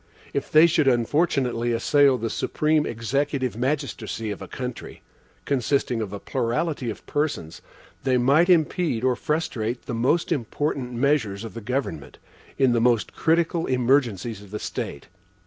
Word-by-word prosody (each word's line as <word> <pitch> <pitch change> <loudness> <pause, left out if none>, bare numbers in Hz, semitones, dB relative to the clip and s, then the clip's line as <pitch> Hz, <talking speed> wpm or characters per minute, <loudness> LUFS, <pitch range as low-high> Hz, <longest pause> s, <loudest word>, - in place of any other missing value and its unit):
If - - -3
they 155 +2 +8
should 155 -3 +2
unfortunately 125 -2 +1
assail 140 +3 +4
the 115 -1 -3
supreme 155 0 +1
executive 130 +2 -1
magistracy 125 -4 -2
of 100 - -6
a - - -7
country, 125 -2 -7 0.4
consisting 130 -3 0
of 105 -3 -4
a 100 - -5
plurality 125 +3 -2
of 110 - -7
persons, 145 - -2 0.4
they 130 -1 +2
might 140 +8 +4
impede 160 -6 +2
or 130 -1 +3
frustrate 125 -6 -2
the - - -4
most 130 +11 +1
important 135 -2 -2
measures 120 -6 0
of 110 -4 -7
the 115 - -7
government, 115 - -4 0.4
in 135 -2 +4
the 120 -1 +2
most 120 -2 +2
critical 165 +1 +1
emergencies 120 -5 +1
of 100 - -14
the 105 - -4
state. - - -5
125 Hz, 145 wpm, -24 LUFS, 115-145 Hz, 0.4 s, they